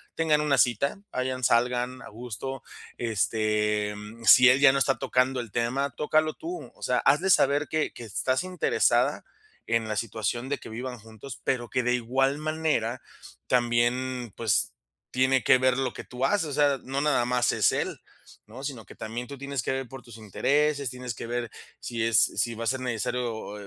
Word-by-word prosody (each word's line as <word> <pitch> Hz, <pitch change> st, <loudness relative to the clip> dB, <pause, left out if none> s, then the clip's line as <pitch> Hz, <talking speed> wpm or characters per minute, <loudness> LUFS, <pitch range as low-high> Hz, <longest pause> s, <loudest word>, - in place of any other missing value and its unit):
tengan 155 Hz, -2 st, +2 dB
una 145 Hz, -2 st, +2 dB
cita, 130 Hz, -, +2 dB
vayan, 130 Hz, 0 st, -3 dB
salgan, 125 Hz, +2 st, +1 dB
a -, -, -10 dB
gusto, 125 Hz, +4 st, -6 dB, 0.4 s
este, 105 Hz, -2 st, 0 dB, 0.3 s
si 125 Hz, +2 st, +9 dB
él 130 Hz, +2 st, +6 dB
ya 140 Hz, -2 st, +7 dB
no 140 Hz, -, 0 dB
está 135 Hz, 0 st, +1 dB
tocando 130 Hz, -1 st, +1 dB
el 120 Hz, -4 st, -6 dB
tema, 125 Hz, +5 st, 0 dB
tócalo 155 Hz, +4 st, 0 dB
tú, 355 Hz, +2 st, -7 dB
o -, -, -14 dB
sea, -, -, +1 dB
hazle 155 Hz, +8 st, +3 dB
saber 145 Hz, -1 st, +3 dB
que 155 Hz, -1 st, -1 dB
que -, -, -9 dB
estás 130 Hz, -, -1 dB
interesada 185 Hz, -, +1 dB, 0.4 s
en 115 Hz, -1 st, 0 dB
la 110 Hz, -, -2 dB
situación 115 Hz, +4 st, -3 dB
de 145 Hz, -, -1 dB
que -, -, -10 dB
vivan 125 Hz, +1 st, -6 dB
juntos, 110 Hz, +4 st, -11 dB
pero 120 Hz, -2 st, -1 dB
que 125 Hz, -, 0 dB
de 125 Hz, 0 st, +1 dB
igual 135 Hz, +4 st, 0 dB
manera 155 Hz, -6 st, -1 dB, 0.5 s
también, 120 Hz, 0 st, +1 dB
pues, 115 Hz, -4 st, +1 dB, 0.4 s
tiene 130 Hz, +1 st, +2 dB
que -, -, +6 dB
ver 130 Hz, 0 st, +2 dB
lo 135 Hz, -, -1 dB
que -, -, -8 dB
tú 125 Hz, +1 st, -3 dB
haces, 175 Hz, +3 st, +1 dB
o -, -, -5 dB
sea, 145 Hz, -1 st, +3 dB
no 135 Hz, +1 st, -2 dB
nada 145 Hz, -5 st, +2 dB
más 125 Hz, 0 st, +2 dB
es -, -, +3 dB
él, -, -, -2 dB, 0.5 s
¿no?, 125 Hz, +5 st, -10 dB
sino 135 Hz, -6 st, -5 dB
que -, -, -14 dB
también 120 Hz, +3 st, -6 dB
tú 140 Hz, +1 st, -8 dB
tienes 140 Hz, -1 st, -3 dB
que -, -, -2 dB
ver 135 Hz, -1 st, -3 dB
por 135 Hz, 0 st, -10 dB
tus 120 Hz, -2 st, -13 dB
intereses, 140 Hz, +6 st, 0 dB
tienes 125 Hz, 0 st, -6 dB
que -, -, -7 dB
ver 120 Hz, -1 st, -3 dB, 0.3 s
si 115 Hz, -2 st, -3 dB
es 115 Hz, 0 st, +3 dB
si 120 Hz, -1 st, +1 dB
va 115 Hz, -, -5 dB
a -, -, -2 dB
ser 130 Hz, +3 st, 0 dB
necesario, 125 Hz, 0 st, -2 dB, 0.4 s
eh, 100 Hz, -, -10 dB
125 Hz, 195 wpm, -27 LUFS, 115-140 Hz, 0.5 s, si